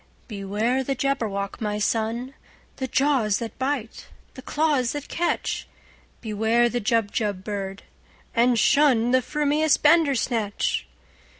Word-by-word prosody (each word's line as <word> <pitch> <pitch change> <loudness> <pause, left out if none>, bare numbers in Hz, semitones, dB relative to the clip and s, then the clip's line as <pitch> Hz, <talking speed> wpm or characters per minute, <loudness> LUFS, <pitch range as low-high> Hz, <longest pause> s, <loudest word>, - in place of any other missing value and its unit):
"Beware 215 +5 -1
the 275 +1 -2
Jabberwock, 225 -8 -2
my 210 -1 -1
son! 225 +4 -1 0.4
The 260 - -3
jaws 255 -6 +2
that 230 +1 -7
bite, 260 -4 -3 0.3
the 260 - -10
claws 290 -4 0
that 290 -1 -6
catch! 345 +1 -2 0.5
Beware 225 +2 +2
the 240 0 -2
Jubjub 210 -3 0
bird, 195 -2 -5 0.5
and 240 0 +3
shunThe 255 -2 +4
frumious 300 +3 +1
Bandersnatch!" 265 -9 +2
240 Hz, 110 wpm, -24 LUFS, 215-275 Hz, 0.5 s, shunThe